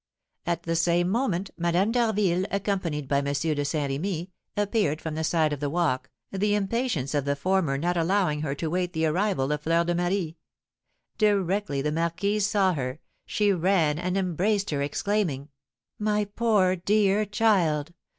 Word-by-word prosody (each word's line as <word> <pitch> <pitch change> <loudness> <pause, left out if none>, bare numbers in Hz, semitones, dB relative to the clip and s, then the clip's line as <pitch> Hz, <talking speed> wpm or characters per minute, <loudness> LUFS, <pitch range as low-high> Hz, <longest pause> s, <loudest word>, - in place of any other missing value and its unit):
At 170 -1 -1
the 165 0 -1
same 175 +1 +2
moment, 200 -4 -1
Madame 175 +5 +2
d'Harville, 210 -6 +1
accompanied 185 -8 -2
by 140 +1 +2
M. 140 - -3
de 150 0 0
Saint 145 -1 -1
Remy, 175 +4 -3 0.3
appeared 205 -7 +1
from 160 -2 -5
the 160 +1 -2
side 155 -2 +2
of 145 - -4
the 145 -1 -1
walk, 135 -5 0 0.2
the 205 +2 +1
impatience 205 - -1
of 145 -2 0
the 140 0 +1
former 165 -3 +1
not 175 +5 0
allowing 170 -3 +1
her 140 -2 -2
to 160 - -3
wait 180 +2 -1
the 160 -1 0
arrival 165 -4 0
of 150 0 -1
Fleur 165 +2 +2
de 175 +1 0
Marie. 175 -1 -1 0.8
Directly 200 -8 +1
the 150 - 0
marquise 195 +6 0
saw 200 -3 +2
her, 130 -1 -4 0.3
she 205 -1 +2
ran 170 -4 +2
and 180 +2 -1
embraced 195 +2 0
her, 140 -2 -1
exclaiming: 150 -2 -1 0.5
"My 210 0 +1
poor 205 -3 +2
dear 200 +2 +2
child! 180 -8 +1
175 Hz, 165 wpm, -26 LUFS, 155-200 Hz, 0.8 s, same